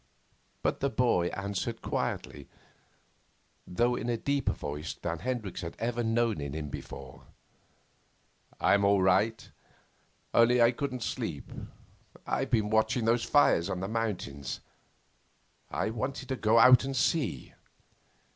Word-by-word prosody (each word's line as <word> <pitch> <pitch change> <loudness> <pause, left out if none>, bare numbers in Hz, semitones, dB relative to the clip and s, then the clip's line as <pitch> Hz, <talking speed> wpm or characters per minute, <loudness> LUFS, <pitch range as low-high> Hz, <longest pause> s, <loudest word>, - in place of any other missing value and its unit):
But - - 0
the 140 - +1
boy 120 -10 +2
answered 100 +5 -4
quietly, 70 -2 -3 1.2
though 120 +7 +1
in 120 - -3
a 120 - 0
deeper 140 +4 0
voice 75 +2 -5
than 85 -1 -4
Hendricks 115 -3 -3
had 85 -2 -6
ever 120 +1 -1
known 115 -4 +1
in 70 -1 -4
him 75 -1 -4
before: 65 -2 -9 1.3
'I'm 100 - +3
all 100 -1 +4
right; 105 +5 +2 0.9
only 120 +1 +5
I 120 0 +6
couldn't 130 -1 -4
sleep. 90 - -4 0.7
I've - - -1
been 110 -3 +1
watching 110 +2 +2
those 115 +1 +2
fires 100 - +3
on 95 - -2
the 95 - -3
mountains. 100 - -3 1.1
I - - -1
I - - -1
wanted 130 +3 -4
to 130 - 0
go 110 -1 +2
out 125 +1 +8
and 135 0 -3
see. 130 - 0
115 Hz, 135 wpm, -29 LUFS, 90-120 Hz, 1.3 s, out